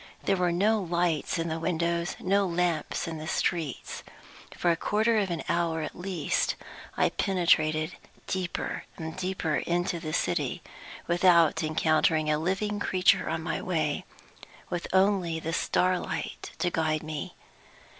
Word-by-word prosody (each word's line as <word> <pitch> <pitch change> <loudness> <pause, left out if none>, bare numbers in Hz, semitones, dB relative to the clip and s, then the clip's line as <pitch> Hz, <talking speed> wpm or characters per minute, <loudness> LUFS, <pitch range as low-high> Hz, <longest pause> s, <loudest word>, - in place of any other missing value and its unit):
There 195 - +2
were 180 -2 +1
no 210 +5 +3
lights 175 -2 0
in 165 0 -1
the 160 0 -2
windows, 170 0 0
no 195 +1 +2
lamps 170 -3 -1
in 160 -1 -4
the 155 - -6
streets. 160 -4 -2 0.6
For 175 - +3
a - - +2
quarter 215 +6 +2
of 195 -2 0
an 170 -2 -3
hour 165 -2 0
at - - -5
least 175 -4 -1 0.4
I - - +4
penetrated 155 -4 +2 0.3
deeper 185 -2 -3
and 160 0 -5
deeper 185 -4 -1
into 175 0 -1
the 155 -2 -5
city, 90 - -1 0.4
without 170 -2 +4
encountering 155 0 +2
a 150 - +2
living 200 +5 -1
creature 185 -2 +3
on - - -2
my - - -2
way - - -1 0.7
with 175 -1 -2
only 190 -4 +2
the 165 +1 -4
starlight 185 +1 -1
to 175 - 0
guide 155 -2 0
me. 155 -2 -5
170 Hz, 145 wpm, -28 LUFS, 160-185 Hz, 0.7 s, I